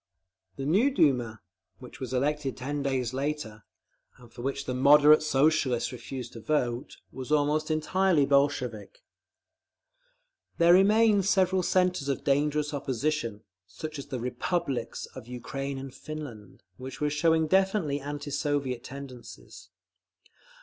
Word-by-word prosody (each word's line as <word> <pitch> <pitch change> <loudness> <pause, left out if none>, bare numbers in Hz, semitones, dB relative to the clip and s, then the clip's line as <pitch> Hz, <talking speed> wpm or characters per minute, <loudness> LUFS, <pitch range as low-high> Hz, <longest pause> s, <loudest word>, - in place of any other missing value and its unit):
The 135 - -5
new 200 - +3
Duma, 125 - +1 0.4
which 125 - -12
was 130 -2 -5
elected 140 +1 -1
ten 145 +3 -3
days 130 -3 -1
later, 135 -6 -4 0.5
and 120 -2 -17
for 120 - -9
which 135 +2 -3
the 130 - -3
"Moderate" 150 +3 +6
Socialists 140 -4 +1
refused 125 0 -7
to 115 - -8
vote, 120 -2 -2
was 130 +2 -7
almost 150 +1 +1
entirely 160 0 +2
Bolshevik…. 140 - 0 1.5
There 170 +1 +6
remained 205 +1 +4
several 190 -2 +3
centres 180 -5 +1
of 140 - -2
dangerous 150 +1 +1
opposition, 130 -5 -2 0.2
such 155 - -7
as 140 - -8
the 130 -3 -4
"republics" 125 +1 -2
of 125 -3 -10
Ukraine 135 +3 -5
and 135 -1 -8
Finland, 130 -12 -9
which 130 +1 -8
were 150 0 0
showing 160 +2 +2
definitely 190 -4 +1
anti 145 +1 -6
Soviet 140 -4 -1
tendencies. 130 -2 -11
140 Hz, 130 wpm, -28 LUFS, 125-155 Hz, 1.5 s, Moderate